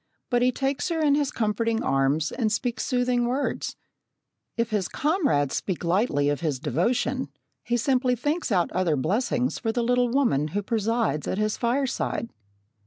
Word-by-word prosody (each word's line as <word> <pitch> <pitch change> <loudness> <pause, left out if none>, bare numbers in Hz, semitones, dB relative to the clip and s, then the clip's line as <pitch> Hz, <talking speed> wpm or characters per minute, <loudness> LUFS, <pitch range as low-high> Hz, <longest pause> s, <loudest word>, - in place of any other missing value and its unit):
But 245 0 +3
he 250 +1 +4
takes 270 +6 -1
her 330 -1 -1
in 300 -2 +3
his 285 -1 +1
comforting 225 +1 0
arms 135 +3 +1
and 225 -4 0
speaks 240 +2 -1
soothing 245 -2 +1
words. 265 +4 -2 0.8
If 230 -1 0
his 200 -4 0
comrades 285 - +1
speak 185 -3 -3
lightly 170 - +1
of 145 - 0
his 155 -5 -1
devotion, 230 - 0 0.3
he 240 - 0
simply 250 +1 +2
thinks 295 +4 -2
out 180 -4 +2
other 180 -4 +1
blessings 235 - 0
for 225 - -1
the 240 +1 -1
little 245 +1 +2
woman 235 - +2
who 205 - -1
presides 225 -6 0
at - - -1
his 215 0 0
fireside. 240 -1 -1
235 Hz, 165 wpm, -25 LUFS, 185-255 Hz, 0.8 s, he